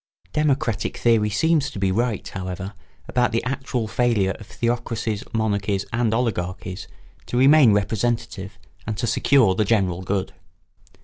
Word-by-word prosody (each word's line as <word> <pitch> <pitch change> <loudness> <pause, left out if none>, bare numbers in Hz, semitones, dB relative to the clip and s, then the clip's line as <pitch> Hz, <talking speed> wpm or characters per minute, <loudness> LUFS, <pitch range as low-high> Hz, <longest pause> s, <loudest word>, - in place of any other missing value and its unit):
] - - -34
Democratic 140 -8 0
theory 115 -3 +3
seems 155 +8 +2
to - - -9
be 95 -1 +1
right, 115 +1 -1
however, 95 +1 -5 0.3
about 125 -1 +1
the 115 - 0
actual 130 -3 -2
failure 110 -4 +1
of 105 - -11
theocracies, 115 -3 -2
monarchies, 100 -3 0
and 115 -1 +1
oligarchies 95 -5 -2 0.4
to 120 - -2
remain 135 -1 +7
representative 105 -1 -1 0.3
and 110 -1 -3
to - - -1
secure 120 -2 +3
the 110 - +1
general 95 -5 +1
good. 95 +1 -2
110 Hz, 140 wpm, -23 LUFS, 100-120 Hz, 0.4 s, remain